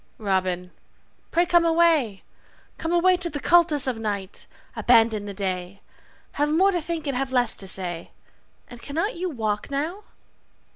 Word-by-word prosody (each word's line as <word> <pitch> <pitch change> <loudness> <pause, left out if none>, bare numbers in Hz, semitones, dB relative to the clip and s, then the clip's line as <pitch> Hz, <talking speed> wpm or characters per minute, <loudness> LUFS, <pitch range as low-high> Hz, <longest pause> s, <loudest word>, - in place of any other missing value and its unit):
Robin, 185 -3 -1 0.6
pray 345 +1 +2
Come 345 -1 +4
away, 325 - +2 0.6
come 325 - -3
away 355 +1 +4
To 355 -1 -3
the 290 - -5
cultus 320 -3 +3
of 250 -4 -1
night. 200 -3 -5 0.3
Abandon 225 -2 +3
the 200 - -6
day. 185 0 -4 0.5
Have 295 +1 0
more 370 +6 +3
to 350 -3 -1
think 325 0 -4
and 280 -3 -2
have 265 +1 -2
less 245 -3 +1
to 195 - -3
say. 175 -3 -1 0.6
And 240 -1 -12
cannot 330 - -2
you 365 +2 -3
walk 215 -7 -3
now? 320 +9 -3
270 Hz, 155 wpm, -24 LUFS, 205-335 Hz, 0.6 s, Come